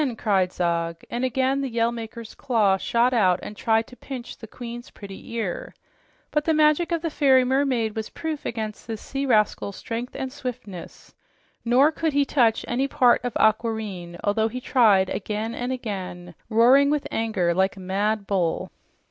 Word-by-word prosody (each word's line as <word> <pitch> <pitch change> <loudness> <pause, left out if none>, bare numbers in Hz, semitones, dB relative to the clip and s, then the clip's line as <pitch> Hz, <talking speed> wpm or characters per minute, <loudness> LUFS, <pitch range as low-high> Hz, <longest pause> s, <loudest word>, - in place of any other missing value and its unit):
cried 195 -5 +1
Zog, 170 -2 -1
and 240 +1 -2
again 260 +2 +1
the 270 - -2
Yell 230 0 +1
Maker's 230 -1 -8
claw 215 -6 +2
shot 235 +5 +1
out 185 -6 +3
and 210 - -7
tried 225 +1 +1
to 250 - -15
pinch 250 -2 -8
the 225 - -11
queen's 240 +1 -8
pretty 195 +2 -11
ear. 220 -6 -4 0.6
But 300 -1 0
the 320 - +2
magic 305 +3 +3
of 335 -1 -1
the 330 - -1
fairy 270 -4 +4
mermaid 255 -4 +1
was 220 -1 -4
proof 315 -2 -5
against 220 -2 -5
this 225 -2 -4
sea 275 +4 -4
rascal's 210 -4 +1
strength 235 +2 -5
and 265 -1 -4
swiftness, 250 -10 -8 0.5
nor 255 +6 +4
could 320 -1 -1
he 285 0 +3
touch 235 -6 +2
any 260 +3 0
part 255 -4 +4
of 245 -2 -3
Aquareine, 215 -6 0
although 220 +2 +2
he 250 +3 -5
tried 215 -7 +3
again 215 +2 -3
and 245 +2 -3
again, 185 -8 -5 0.2
roaring 250 +5 +5
with 295 -1 0
anger 210 -6 0
like 190 +3 +1
a - - -9
mad 200 +3 -1
bull. 185 -5 -1
230 Hz, 175 wpm, -24 LUFS, 205-260 Hz, 0.6 s, roaring